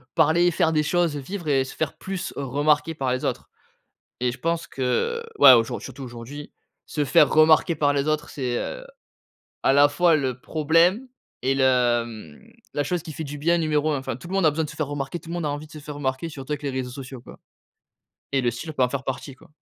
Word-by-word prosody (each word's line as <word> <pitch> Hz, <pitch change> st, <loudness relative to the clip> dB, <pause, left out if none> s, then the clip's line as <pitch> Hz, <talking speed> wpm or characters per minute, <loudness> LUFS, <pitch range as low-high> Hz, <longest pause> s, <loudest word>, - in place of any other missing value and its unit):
parler 165 Hz, +2 st, +4 dB
et -, -, +3 dB
faire 160 Hz, 0 st, +2 dB
des 155 Hz, -1 st, +2 dB
choses, 170 Hz, -2 st, +1 dB
heu, -, -, -4 dB
vivre 175 Hz, +3 st, -6 dB
et 135 Hz, -2 st, +2 dB
se -, -, -10 dB
faire 155 Hz, -, -3 dB
plus 190 Hz, -1 st, -5 dB
remarquer 145 Hz, +4 st, +1 dB
par 130 Hz, -4 st, -1 dB
les 130 Hz, -, -2 dB
autres -, -, -3 dB, 0.7 s
et 125 Hz, -1 st, +1 dB
je 120 Hz, -, -8 dB
pense 165 Hz, 0 st, -2 dB
que, 300 Hz, -, -1 dB
heu, -, -, -8 dB, 0.2 s
ouais, -, -, +11 dB
aujour 115 Hz, -2 st, +2 dB
surtout 135 Hz, +1 st, -8 dB
aujourd'hui, 125 Hz, +5 st, -9 dB, 0.3 s
se 150 Hz, -2 st, -1 dB
faire 150 Hz, +2 st, +5 dB
remarquer 155 Hz, +1 st, +5 dB
par 145 Hz, -1 st, +2 dB
les 140 Hz, +1 st, 0 dB
autres 155 Hz, -1 st, -1 dB
c'est, 125 Hz, -4 st, -2 dB
heu, -, -, -5 dB, 0.8 s
à 135 Hz, -, +4 dB
la 145 Hz, +1 st, +6 dB
fois 165 Hz, +2 st, +4 dB
le 130 Hz, -3 st, -2 dB
problème 165 Hz, -, +2 dB, 0.4 s
et 135 Hz, +1 st, +1 dB
le, 135 Hz, -1 st, +2 dB, 0.4 s
hem, 105 Hz, -10 st, -12 dB, 0.2 s
la 145 Hz, -, -1 dB
chose 175 Hz, +2 st, -2 dB
qui 160 Hz, -, -8 dB
fait 160 Hz, -, -5 dB
du 145 Hz, +1 st, -6 dB
bien 170 Hz, +4 st, +2 dB
numéro 155 Hz, -1 st, +1 dB
1. 145 Hz, -, 0 dB
Enfin, 130 Hz, -3 st, -4 dB
tout 170 Hz, -, -11 dB
le -, -, -7 dB
monde 195 Hz, -4 st, +3 dB
a -, -, +6 dB
besoin 160 Hz, +2 st, -1 dB
de -, -, -6 dB
se -, -, -12 dB
faire 155 Hz, -, -1 dB
remarquer. 145 Hz, +3 st, -4 dB
Tout 165 Hz, -, -14 dB
le 170 Hz, -, -4 dB
monde 170 Hz, -2 st, -3 dB
a 145 Hz, -, 0 dB
envie 145 Hz, +2 st, -5 dB
de -, -, -19 dB
se 155 Hz, -, -9 dB
faire 150 Hz, 0 st, -8 dB
remarquer, 135 Hz, +3 st, -2 dB
surtout 140 Hz, 0 st, -7 dB
avec 150 Hz, 0 st, -4 dB
les 140 Hz, -, -2 dB
réseaux 130 Hz, -1 st, -4 dB
sociaux, 130 Hz, -1 st, -8 dB
quoi -, -, -14 dB, 0.9 s
et 135 Hz, -1 st, +2 dB
le 120 Hz, -1 st, +1 dB
style 155 Hz, +7 st, -6 dB
peut 130 Hz, -, +1 dB
en 125 Hz, -, +2 dB
faire 135 Hz, -1 st, -3 dB
partie, 135 Hz, +1 st, -5 dB
quoi. 130 Hz, -, -20 dB
145 Hz, 250 wpm, -24 LUFS, 130-160 Hz, 0.9 s, ouais